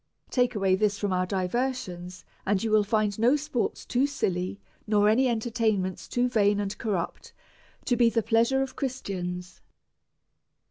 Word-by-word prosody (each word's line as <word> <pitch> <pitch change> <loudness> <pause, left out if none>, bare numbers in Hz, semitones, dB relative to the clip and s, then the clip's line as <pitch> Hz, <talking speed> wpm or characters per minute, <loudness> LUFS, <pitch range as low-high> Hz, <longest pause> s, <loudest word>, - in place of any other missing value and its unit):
Take 245 -2 +2
away 195 -2 +2
this 205 +1 +2
from 205 -2 -1
our 185 0 0
diversions, 185 -2 -3 0.2
and 195 0 0
you 225 - -1
will 215 -1 +5
find 210 0 0
no 240 +5 +4
sports 295 -5 -2
too 260 +2 +1
silly, 185 -8 -2 0.3
nor 210 -1 +3
any 245 +5 +4
entertainments 220 -5 -1
too 245 0 +1
vain 205 -4 +2
and 200 -1 -2
corrupt, 200 -6 -3 0.5
to 245 - +2
be 240 -1 +4
the 230 0 0
pleasure 235 +4 +3
of 265 - -7
Christians. 180 -9 -4
215 Hz, 150 wpm, -27 LUFS, 190-245 Hz, 0.5 s, will